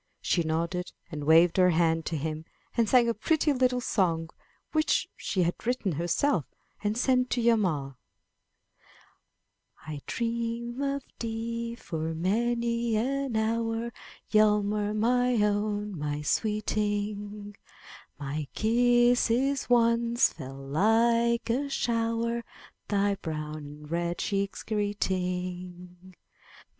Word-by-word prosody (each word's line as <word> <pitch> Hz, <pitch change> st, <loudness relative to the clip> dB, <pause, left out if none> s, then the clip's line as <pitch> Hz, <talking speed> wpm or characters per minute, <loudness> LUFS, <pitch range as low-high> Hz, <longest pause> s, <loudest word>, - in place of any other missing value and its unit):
She 175 Hz, -, +1 dB
nodded 170 Hz, +3 st, -2 dB, 0.2 s
and 150 Hz, -2 st, -5 dB
waved 165 Hz, +3 st, +5 dB
her 180 Hz, -1 st, +6 dB
hand 165 Hz, -1 st, +2 dB
to 160 Hz, -, -1 dB
him, 155 Hz, +1 st, -3 dB, 0.3 s
and 230 Hz, -3 st, +2 dB
sang 245 Hz, -2 st, +5 dB
a 235 Hz, -, +2 dB
pretty 300 Hz, +6 st, +1 dB
little 255 Hz, -1 st, +2 dB
song 165 Hz, -9 st, 0 dB, 0.4 s
which 310 Hz, -1 st, +2 dB
she 185 Hz, -, -1 dB
had 170 Hz, +1 st, +1 dB
written 245 Hz, -6 st, 0 dB
herself 170 Hz, -, +1 dB, 0.4 s
and 210 Hz, +1 st, 0 dB
sent 250 Hz, 0 st, +2 dB
to 245 Hz, -, 0 dB
Hjalmar: 180 Hz, -, +1 dB, 1.9 s
'*I 150 Hz, -2 st, -6 dB
dream 235 Hz, +2 st, -2 dB
of 280 Hz, -1 st, -1 dB, 0.2 s
thee 230 Hz, +1 st, -3 dB
for 160 Hz, -6 st, -4 dB
many 235 Hz, +5 st, 0 dB
an 265 Hz, +2 st, -1 dB
hour, 225 Hz, +1 st, -1 dB, 0.3 s
Hjalmar, 210 Hz, -1 st, +2 dB
my 245 Hz, +3 st, +2 dB
own, 210 Hz, -1 st, 0 dB
my 150 Hz, 0 st, -3 dB
sweeting; 205 Hz, +1 st, -2 dB, 0.6 s
My 145 Hz, +1 st, -4 dB
kisses 245 Hz, +3 st, +3 dB
once 235 Hz, 0 st, +3 dB
fell 135 Hz, +1 st, -8 dB
like 230 Hz, +8 st, +3 dB
a 280 Hz, +4 st, -1 dB
shower, 230 Hz, -2 st, 0 dB, 0.4 s
Thy 200 Hz, 0 st, +2 dB
brow 155 Hz, -5 st, -5 dB
and 150 Hz, 0 st, -9 dB
red 170 Hz, 0 st, -1 dB
cheeks 200 Hz, -1 st, -2 dB
greeting. 180 Hz, -3 st, -3 dB
210 Hz, 110 wpm, -28 LUFS, 175-235 Hz, 1.9 s, her